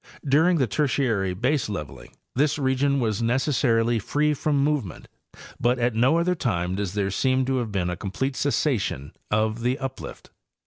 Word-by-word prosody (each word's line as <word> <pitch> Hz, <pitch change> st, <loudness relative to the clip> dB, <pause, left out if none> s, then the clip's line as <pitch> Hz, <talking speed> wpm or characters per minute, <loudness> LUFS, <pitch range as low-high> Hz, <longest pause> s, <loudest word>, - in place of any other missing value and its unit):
During 160 Hz, +6 st, +4 dB
the 135 Hz, -, +2 dB
Tertiary 115 Hz, -6 st, 0 dB
baseleveling 100 Hz, -, -3 dB, 0.2 s
this 145 Hz, +4 st, +1 dB
region 140 Hz, 0 st, +1 dB
was 110 Hz, -3 st, -1 dB
necessarily 120 Hz, -2 st, +1 dB
free 150 Hz, +8 st, +1 dB
from 150 Hz, 0 st, 0 dB
movement, 145 Hz, -, -2 dB, 0.5 s
but 120 Hz, +2 st, +2 dB
at 120 Hz, -1 st, +1 dB
no 125 Hz, +8 st, +3 dB
other 175 Hz, +2 st, +2 dB
time 95 Hz, -, -1 dB
does 100 Hz, -1 st, -3 dB
there 100 Hz, -1 st, 0 dB
seem 130 Hz, +5 st, +1 dB
to 130 Hz, 0 st, 0 dB
have 120 Hz, -4 st, -2 dB
been 90 Hz, -3 st, -1 dB
a -, -, -3 dB
complete 130 Hz, +9 st, -3 dB
cessation 125 Hz, -, -1 dB, 0.2 s
of 110 Hz, +2 st, 0 dB
the 125 Hz, +3 st, 0 dB
uplift. 135 Hz, -2 st, -7 dB
125 Hz, 155 wpm, -24 LUFS, 105-140 Hz, 0.5 s, During